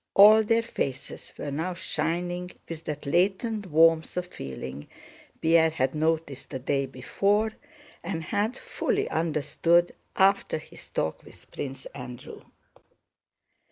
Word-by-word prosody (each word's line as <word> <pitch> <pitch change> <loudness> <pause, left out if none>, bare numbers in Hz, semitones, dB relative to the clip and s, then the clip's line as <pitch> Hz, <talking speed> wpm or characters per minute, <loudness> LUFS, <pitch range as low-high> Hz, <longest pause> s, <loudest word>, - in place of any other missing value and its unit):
All 215 +2 +9
their 230 +2 +2
faces 135 - -4
were 145 - -4
now 165 +6 -2
shining 175 +1 -2 0.2
with 165 -1 -7
that 150 -1 -5
latent 195 - +1
warmth 165 +1 +4
of 180 - 0
feeling 70 - -7 0.5
Pierre 165 0 +5
had 135 -4 0
noticed 155 -3 -1
the 135 - -4
day 135 +1 0
before 200 - +1 0.5
and 170 -2 -3
had 210 +8 -1
fully 470 -4 -1
understood 165 +2 +2 0.2
after 195 -4 +3
his 155 - -12
talk 80 - -2
with - - -16
Prince 135 -1 -6
Andrew. 125 -2 -9
165 Hz, 125 wpm, -27 LUFS, 145-190 Hz, 0.5 s, All